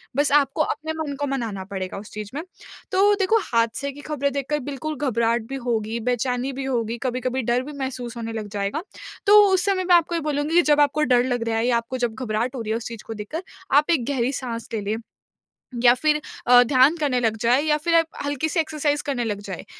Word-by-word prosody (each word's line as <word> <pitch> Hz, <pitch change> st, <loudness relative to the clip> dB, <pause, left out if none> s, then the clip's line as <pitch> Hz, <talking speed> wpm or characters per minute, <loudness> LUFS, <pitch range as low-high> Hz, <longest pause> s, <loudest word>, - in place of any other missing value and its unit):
बस 290 Hz, +1 st, +2 dB
आपको 285 Hz, +1 st, +3 dB
अपने 310 Hz, +1 st, -2 dB
मन 300 Hz, -3 st, -3 dB
को 285 Hz, -, -1 dB
मनाना 230 Hz, -8 st, -3 dB
पड़ेगा 190 Hz, -1 st, -5 dB
उस 205 Hz, +1 st, -9 dB
चीज़ 210 Hz, -1 st, -6 dB
में। 300 Hz, -, -2 dB, 0.5 s
तो 400 Hz, +2 st, +4 dB
देखो 400 Hz, +3 st, +3 dB
हादसे 230 Hz, +4 st, 0 dB
की 285 Hz, +1 st, -11 dB
ख़बरें 285 Hz, -2 st, -1 dB
देखकर 280 Hz, +2 st, -1 dB
बिल्कुल 290 Hz, +2 st, -5 dB
घबराहट 235 Hz, -4 st, +1 dB
भी 270 Hz, -, -4 dB
होगी, 225 Hz, -1 st, -1 dB
बेचैनी 250 Hz, +2 st, -1 dB
भी 270 Hz, +1 st, -5 dB
होगी, 235 Hz, -3 st, -1 dB
कभी-कभी 255 Hz, 0 st, -1 dB
डर 240 Hz, +2 st, 0 dB
भी 295 Hz, +3 st, -8 dB
महसूस 250 Hz, -3 st, -5 dB
होने 230 Hz, -1 st, -5 dB
लग 220 Hz, -2 st, -4 dB
जाएगा। 200 Hz, -, -2 dB, 0.4 s
तो 420 Hz, +1 st, +9 dB
उस 370 Hz, -1 st, +2 dB
समय 390 Hz, -2 st, +1 dB
मैं 360 Hz, -1 st, +5 dB
आपको 340 Hz, 0 st, +2 dB
ये 335 Hz, -, -1 dB
बोलूँगी 295 Hz, +1 st, -1 dB
कि 350 Hz, -, +7 dB
जब 295 Hz, 0 st, +5 dB
आपको 290 Hz, +1 st, +2 dB
डर 245 Hz, -, +4 dB
लग 245 Hz, -1 st, -1 dB
रहा 225 Hz, -, 0 dB
है 225 Hz, -, +1 dB
या 240 Hz, -2 st, +3 dB
आपको 235 Hz, +2 st, -4 dB
जब 225 Hz, -2 st, -5 dB
घबराहट 235 Hz, +1 st, -2 dB
हो 245 Hz, -, -4 dB
रही 220 Hz, -, -4 dB
है 225 Hz, -, +1 dB
उस 230 Hz, -, -6 dB
चीज़ 230 Hz, -2 st, -8 dB
को 225 Hz, -, -4 dB
देखकर 220 Hz, -, -6 dB, 0.3 s
आप 300 Hz, +3 st, +3 dB
एक 280 Hz, -8 st, +1 dB
गहरी 255 Hz, -1 st, 0 dB
साँस 230 Hz, -2 st, -5 dB
ले 220 Hz, -, -1 dB
लें। 205 Hz, +2 st, -2 dB, 0.9 s
या 240 Hz, -1 st, +8 dB
फिर 300 Hz, +4 st, +1 dB, 0.3 s
अ, 245 Hz, 0 st, +8 dB
ध्यान 260 Hz, +5 st, +4 dB
करने 285 Hz, -5 st, +1 dB
लग 225 Hz, -2 st, +1 dB
जाएँ 245 Hz, +4 st, +3 dB
या 305 Hz, -1 st, +2 dB
फिर 335 Hz, +2 st, 0 dB
आप 330 Hz, 0 st, +5 dB, 0.2 s
हल्की-सी 295 Hz, +4 st, -1 dB
एक्सरसाइज़ 300 Hz, -2 st, 0 dB
करने 270 Hz, -4 st, -1 dB
लग 205 Hz, -3 st, -3 dB
जाए। 190 Hz, -3 st, -6 dB
260 Hz, 230 wpm, -23 LUFS, 230-295 Hz, 0.9 s, तो